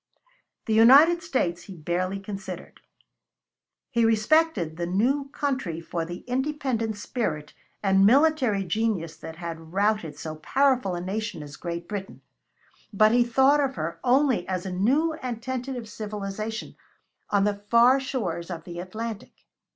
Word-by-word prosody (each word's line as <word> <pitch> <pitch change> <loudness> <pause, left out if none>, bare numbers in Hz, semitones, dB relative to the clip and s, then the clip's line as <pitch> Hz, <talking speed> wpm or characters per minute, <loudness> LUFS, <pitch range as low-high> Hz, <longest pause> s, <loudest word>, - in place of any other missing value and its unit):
The 220 - 0
United 280 +10 +7
States 180 - -1
he 190 -3 -10
barely 180 +4 -2
considered. 195 -3 -8 1.1
He 235 -3 +2
respected 225 - +2
the 170 +1 -3
new 260 +10 +1
country 265 - -2
for 165 0 -4
the 175 +1 -7
independent 255 -4 -2
spirit 155 - -3 0.3
and 195 -1 +4
military 255 -3 +4
genius 190 -3 -1
that 160 - -9
had 165 -1 -8
routed 200 -6 0
so 155 +1 -6
powerful 255 - +1
a 175 - -4
nation 195 -3 -4
as 145 0 -10
Great 170 0 -5
Britain, 200 -2 -6 0.7
but 215 +1 +4
he 240 +1 +5
thought 265 +5 +4
of 275 -2 0
her 165 +1 -4
only 255 -6 +2
as 185 0 -3
a 190 - -4
new 275 - +2
and 245 -3 -4
tentative 250 -1 -4
civilization 215 +1 -5 0.5
on 200 -1 +2
the 205 0 -1
far 240 +3 +6
shores 255 -10 -3
of 165 -3 -6
the 175 0 -8
Atlantic. 215 +4 -7
215 Hz, 145 wpm, -26 LUFS, 175-255 Hz, 1.1 s, United